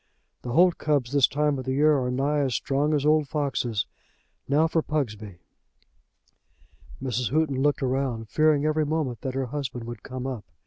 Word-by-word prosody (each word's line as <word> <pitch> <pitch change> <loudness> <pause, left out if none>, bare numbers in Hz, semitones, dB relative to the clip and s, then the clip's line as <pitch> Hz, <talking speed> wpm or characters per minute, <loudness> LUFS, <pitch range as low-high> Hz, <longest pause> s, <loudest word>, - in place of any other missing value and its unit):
"The 120 - -5
holt 175 +3 +4
cubs 140 -5 0
this 140 -2 +5
time 150 -1 0
of 130 - -6
the 130 - -1
year 150 +2 +4
are 125 -1 -1
nigh 140 +4 0
as 135 -5 0
strong 145 +5 0
as 145 -1 0
old 155 -1 +3
foxes. 130 -8 -1 0.6
Now 150 +3 +3
for 160 0 +1
Pugsby." 110 - -3 1.6
Mrs. 125 -2 -2
Houghton 140 -1 +1
looked 145 0 +1
round, 130 -3 -1
fearing 155 +2 +2
every 155 0 +2
moment 145 -6 -2
that 130 -1 -4
her 135 0 -1
husband 125 -2 -5
would 120 -2 -7
come 130 -1 -6
up. 125 -6 -4
135 Hz, 175 wpm, -26 LUFS, 125-150 Hz, 1.6 s, this